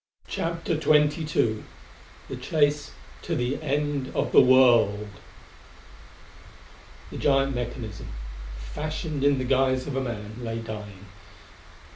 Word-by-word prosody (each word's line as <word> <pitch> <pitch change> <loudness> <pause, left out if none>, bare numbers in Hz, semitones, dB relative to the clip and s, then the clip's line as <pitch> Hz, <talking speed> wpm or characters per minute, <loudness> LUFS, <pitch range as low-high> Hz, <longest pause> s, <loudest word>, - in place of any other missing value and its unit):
CHAPTER 165 -2 -2
XXII 150 -7 +2 0.6
The - - -5
Chase 145 -1 +1 0.3
to - - -2
the 125 +4 -1
End 145 -2 -1
of - - 0
the - - +8
World 120 -5 +5 2.0
The - - -6
giant 135 -1 +2
mechanism, 120 -4 -5 0.5
fashioned 150 - -4
in 140 -1 +4
the 130 - -1
guise 130 0 +2
of 140 - -4
a 135 - 0
man, 110 -3 -5
lay 115 -2 -4
dying. 105 -3 -7
130 Hz, 110 wpm, -26 LUFS, 115-145 Hz, 2.0 s, the